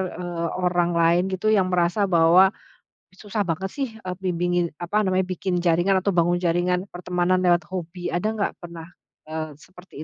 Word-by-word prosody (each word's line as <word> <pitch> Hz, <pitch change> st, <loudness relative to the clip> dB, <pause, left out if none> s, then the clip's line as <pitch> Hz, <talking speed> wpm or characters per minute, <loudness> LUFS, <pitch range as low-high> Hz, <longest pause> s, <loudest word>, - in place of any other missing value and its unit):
eee, 175 Hz, -1 st, -4 dB
orang 175 Hz, -1 st, 0 dB
lain 170 Hz, +1 st, +3 dB
gitu 190 Hz, +3 st, 0 dB
yang 195 Hz, -4 st, +3 dB
merasa 180 Hz, +3 st, +1 dB
bahwa, 175 Hz, +1 st, +6 dB, 0.6 s
"Susah 205 Hz, +3 st, -5 dB
banget 185 Hz, 0 st, -2 dB
sih, 275 Hz, -2 st, -2 dB
eee, 185 Hz, -4 st, -6 dB
bimbingin 175 Hz, -1 st, 0 dB
apa 180 Hz, +5 st, 0 dB
namanya, 190 Hz, -2 st, +1 dB
bikin 185 Hz, 0 st, -2 dB
jaringan 175 Hz, +2 st, +2 dB
atau 200 Hz, -, +2 dB
bangun 175 Hz, 0 st, +2 dB
jaringan 180 Hz, +1 st, 0 dB
pertemanan 180 Hz, +1 st, 0 dB
lewat 175 Hz, -1 st, +3 dB
hobi." 175 Hz, -1 st, -6 dB
Ada 175 Hz, +5 st, 0 dB
nggak 215 Hz, -2 st, -2 dB
pernah 170 Hz, -2 st, -9 dB, 0.7 s
seperti, 180 Hz, +3 st, -17 dB
180 Hz, 155 wpm, -23 LUFS, 175-190 Hz, 0.7 s, bahwa